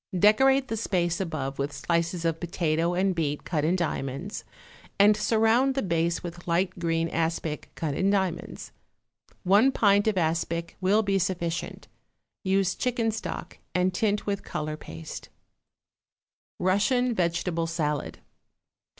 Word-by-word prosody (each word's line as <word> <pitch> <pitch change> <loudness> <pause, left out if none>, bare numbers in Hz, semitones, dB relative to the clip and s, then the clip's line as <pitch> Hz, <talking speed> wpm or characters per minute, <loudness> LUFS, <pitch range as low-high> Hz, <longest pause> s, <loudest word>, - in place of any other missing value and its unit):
Decorate 265 +8 +5
the 225 - -3
space 175 -5 0
above 140 -7 -4
with 140 +1 -1
slices 170 +4 -1
of 165 -1 0
potato 170 0 0
and 190 +1 +2
beet 150 -4 -2
cut 155 -4 -1
in 165 +4 +2
diamonds, 155 0 -3 0.5
and 205 +1 +6
surround 225 +5 +3
the 270 - 0
base 170 -2 0
with 175 0 -8
light 180 +2 0
green 165 -1 0
aspic 160 -2 -2
cut 155 -3 -2
in 190 +6 +1
diamonds. 190 -4 -2 0.7
One 205 +8 +5
pint 205 -4 +3
of 215 -3 +1
aspic 170 0 -1
will 200 +4 +3
be 195 -1 +1
sufficient; 175 -2 -3 0.6
use 190 -1 +2
chicken 235 -3 0
stock, 220 - -6 0.2
and 180 +1 +2
tint 205 +2 0
with 200 -1 -2
color 155 0 -4
paste. 80 - -9 1.3
=Russian 235 +7 +2
Vegetable 170 -2 0
Salad. 150 -3 -2
180 Hz, 135 wpm, -27 LUFS, 165-205 Hz, 1.3 s, and